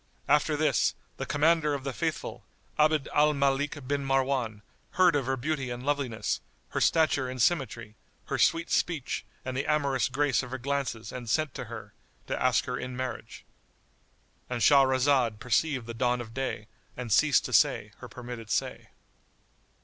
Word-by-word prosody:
[FN#96] - - +4
After - - 0
this, - - +2 0.2
the - - -3
Commander 150 0 +2
of 135 - -6
the 135 -1 -3
Faithful, 110 - -3 0.4
Abd 155 -1 +3
al 150 0 +4
Malik 140 0 0
bin 140 0 -1
Marwan, 130 -5 0 0.3
heard 180 -4 +4
of 135 -3 0
her 135 0 0
beauty 135 0 -2
and 120 +1 -6
loveliness, 130 -7 -1 0.3
her - - -2
stature 150 -5 +3
and 130 0 -6
symmetry, 120 -7 0 0.3
her - - -3
sweet 165 +1 +2
speech 160 -7 0 0.2
and 130 -1 -4
the 135 - -2
amorous 140 -4 +1
grace 135 +1 +1
of 125 - -8
her 130 - -4
glances 130 -3 -3
and 120 -3 -7
sent 155 +2 +1
to - - -6
her, - - -9 0.3
to - - -3
ask 130 -1 +3
her 125 -1 -3
in 125 0 -6
marriage;——And 125 -1 -9
Shahrazad 130 -4 +4
perceived 125 +3 0
the 115 - -6
dawn 125 +1 +1
of 115 -2 -8
day 130 -5 -3 0.3
and 125 -3 -5
ceased 145 +6 +4
to - - -5
say - - +3
her - - -9
permitted 120 -3 -8
say. - - -2
135 Hz, 165 wpm, -28 LUFS, 125-145 Hz, 0.4 s, FN#96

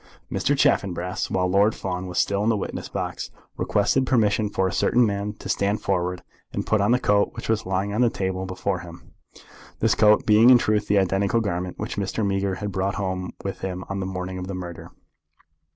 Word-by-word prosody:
Mr. - - +1
Chaffanbrass, 90 -1 +1
while 90 -1 +1
Lord 100 +4 +3
Fawn 90 -1 -4
was 90 - -6
still 100 0 +1
in 110 - +2
the 110 - +2
witness 100 - -5
box, - - -4 0.3
requested 125 +6 +1
permission 105 -3 +2
for 95 -2 0
a - - -2
certain 120 0 +3
man 100 0 -2
to - - -9
stand 100 +2 0
forward, 90 -1 -1 0.3
and - - -2
put 110 -2 +2
on 100 - +2
the 125 - +5
coat 105 -4 +2
which - - -6
was 110 -3 0
lying 95 +2 -1
on 110 - +1
the 120 - +5
table 95 -2 -3
before 95 0 -2
him, 85 -1 -12 0.7
this - - +3
coat 105 -1 +4
being 110 +3 +6
in 125 - +9
truth 105 -3 0
the 105 - +3
identical 95 +3 +2
garment 90 -4 -3
which 110 +1 -5
Mr. 100 +2 -1
Meager 95 -1 0
had 100 +2 -4
brought 95 +1 -1
home 95 -2 -3
with 95 - -4
him 90 -1 -4
on 100 0 -3
the 95 - -3
morning 95 0 -4
of 90 - -5
the 95 - -4
murder. 90 -2 -7
100 Hz, 210 wpm, -24 LUFS, 95-105 Hz, 0.7 s, in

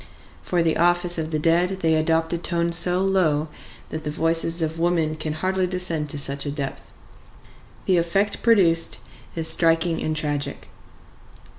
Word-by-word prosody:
For 175 -2 0
the 165 -1 0
office 175 0 +2
of 155 -1 -3
the 155 - -1
dead 175 +4 +1
they 160 -1 +2
adopt 160 +1 +1
a 170 - -2
tone 170 0 -1
so 175 +2 +4
low 160 -6 +1 0.4
that 160 0 -6
the 150 - -4
voices 165 +2 0
of 160 +1 -3
women 165 -2 0
can 155 0 -4
hardly 185 +3 -1
descend 175 -5 -1
to 145 - -3
such 140 0 -1
a 145 - -4
depth. 140 -2 -6 1.0
The 185 - +2
effect 195 +5 0
produced 175 -8 +2 0.4
is 165 -1 -1
striking 165 +1 +2
and 155 - -2
tragic. 145 -2 -3
165 Hz, 160 wpm, -23 LUFS, 155-175 Hz, 1.0 s, so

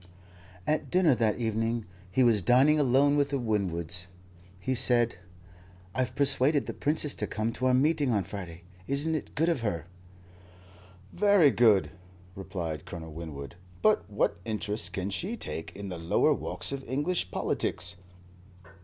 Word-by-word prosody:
At 155 - 0
dinner 180 -5 +4
that 115 -3 +1
evening 115 0 -1 0.2
he 130 +8 +2
was 115 -4 +4
dining 130 - +4
alone 140 +1 +3
with 145 -1 +2
the 140 - -1
Winwoods 90 -7 -2 0.5
he 130 +8 -1
said: 120 -3 +3 0.8
"I've 125 -1 -1
persuaded 140 +1 +3
the - - -5
Princess 150 0 0
to - - -3
come 110 +1 -2
to 130 - -1
our 130 - +3
meeting 145 +1 +2
on 105 -4 +1
Friday. 85 -3 -8 0.2
Isn't 145 +4 0
it 155 - -4
good 160 +3 +2
of 165 -8 +1
her?" 95 -8 -2 1.3
"Very 200 -7 +5
good," 110 -6 +4 0.4
replied 90 -5 -5
Colonel 80 -2 -8
Winwood. 80 -1 -8 0.3
"But - - +3
what - - 0
interest 105 0 -2
can 95 +1 -3
she 200 - -2
take 80 - -6
in 100 0 -6
the 90 -2 -6
lower 85 +1 +3
walks - - -3
of 135 -1 -4
English 145 - -1
politics?" 90 -1 -2
115 Hz, 150 wpm, -28 LUFS, 95-140 Hz, 1.3 s, Very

